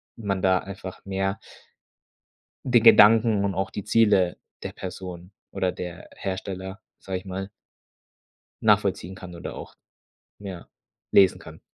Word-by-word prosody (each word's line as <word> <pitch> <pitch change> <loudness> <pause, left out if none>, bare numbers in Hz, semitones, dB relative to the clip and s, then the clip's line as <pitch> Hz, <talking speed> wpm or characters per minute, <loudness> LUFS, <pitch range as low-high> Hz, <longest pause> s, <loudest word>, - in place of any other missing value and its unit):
man 100 -5 -3
da 95 -1 +3
einfach 95 -1 -9
mehr 95 0 -2 1.3
den 120 -2 +5
Gedanken 110 -2 +6
und 100 - -1
auch 95 +2 -2
die 105 - -6
Ziele 100 -6 +3 0.3
der - - -4
Person 90 -1 -8 0.2
oder 95 -1 -1
der 90 -2 -8
Hersteller, 95 +1 -5 0.2
sage 95 -1 -5
ich 90 - -18
mal 95 +1 -5 1.1
nachvollziehen 95 +3 +2
kann 90 -1 -10
oder 85 - -7
auch, - - -10 0.6
ja, 95 -4 -8 0.4
lesen 95 -3 +5
kann. - - -12
95 Hz, 130 wpm, -25 LUFS, 90-100 Hz, 1.3 s, Gedanken